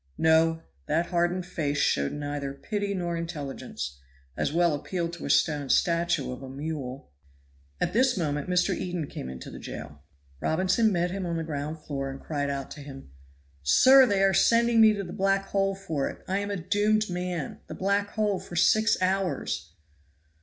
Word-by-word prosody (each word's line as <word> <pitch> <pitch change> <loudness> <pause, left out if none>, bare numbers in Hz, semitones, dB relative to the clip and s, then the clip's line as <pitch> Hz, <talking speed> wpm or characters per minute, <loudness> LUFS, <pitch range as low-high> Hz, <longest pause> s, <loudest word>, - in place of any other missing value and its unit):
No! 160 0 +3 0.2
that 165 +3 +1
hardened 175 +1 +1
face 150 -5 -2
showed 70 - +1
neither 145 -1 -4
pity 205 +4 -3
nor 175 -2 -2
intelligence; 145 - -5 0.4
as - - -1
well 170 0 +3
appeal 170 +3 -2
to 170 0 -7
a - - -5
stone 145 -4 +2
statue 170 -5 +2
of 125 - -7
a 135 - -8
mule. 135 - -6 0.7
At - - 0
this 250 +1 +3
moment 150 -2 -2
Mr. 180 0 +2
Eden 175 -3 -3
came 65 - -7
into 65 0 -8
the - - -9
jail. 70 0 -8 0.4
Robinson 185 - +2
met 175 -1 0
him 190 -1 -3
on 170 -1 -2
the 165 - -2
ground 150 0 -4
floor, 135 -2 -3
and 135 0 -7
cried 145 -2 -2
out 140 -1 -4
to 145 - -8
him, 135 - -10 0.5
"Sir, 260 - +7
they 200 -3 +2
are 195 0 +4
sending 230 +4 +4
me 220 -1 +7
to 200 -1 -3
the 175 - -8
black 195 0 +1
hole 195 0 +1
for 165 -8 -2
it. - - -11
I 190 +2 0
am 200 0 -3
a 200 - -2
doomed 210 +4 +1
man; 180 -4 -4
the - - -7
black 200 +1 0
hole 210 -3 0
for 175 - -10
six 215 +6 +4
hours." 185 - -1
170 Hz, 180 wpm, -27 LUFS, 145-195 Hz, 0.7 s, Sir